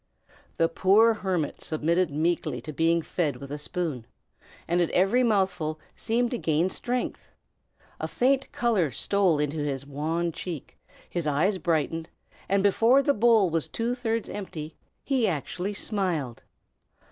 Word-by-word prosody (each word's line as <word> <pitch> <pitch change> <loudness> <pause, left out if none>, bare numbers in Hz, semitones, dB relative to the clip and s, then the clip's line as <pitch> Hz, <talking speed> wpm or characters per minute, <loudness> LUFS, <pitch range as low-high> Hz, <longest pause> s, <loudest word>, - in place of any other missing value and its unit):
The 165 - +4
poor 205 +7 +4
hermit 185 -7 -2
submitted 165 +3 0
meekly 155 -3 -1
to 155 +4 -7
being 165 +3 +2
fed 155 -4 -1
with 140 0 -9
a 145 - -4
spoon, 150 -6 -3 0.6
and 175 +1 +2
at 170 - +1
every 195 +7 +3
mouthful 190 -9 +1 0.2
seemed 235 +2 0
to 245 - -2
gain 165 +4 +1
strength. 245 +1 -3 0.7
A - - -2
faint 270 +2 +1
color 215 -10 +1
stole 185 - +1
into 150 +1 -1
his 140 -2 -2
wan 160 +4 -2
cheek, 165 -3 -7 0.3
his 170 -3 -3
eyes 175 +7 +1
brightened, 165 0 -1 0.4
and 195 0 +2
before 230 +7 +4
the 285 - +3
bowl 220 -5 +4
was 165 -1 -1
two 235 +1 -2
thirds 230 -3 -2
empty, 160 -6 -6 0.3
he 260 -5 +1
actually 185 +5 -3
smiled. 175 - -2
175 Hz, 145 wpm, -27 LUFS, 155-210 Hz, 0.7 s, The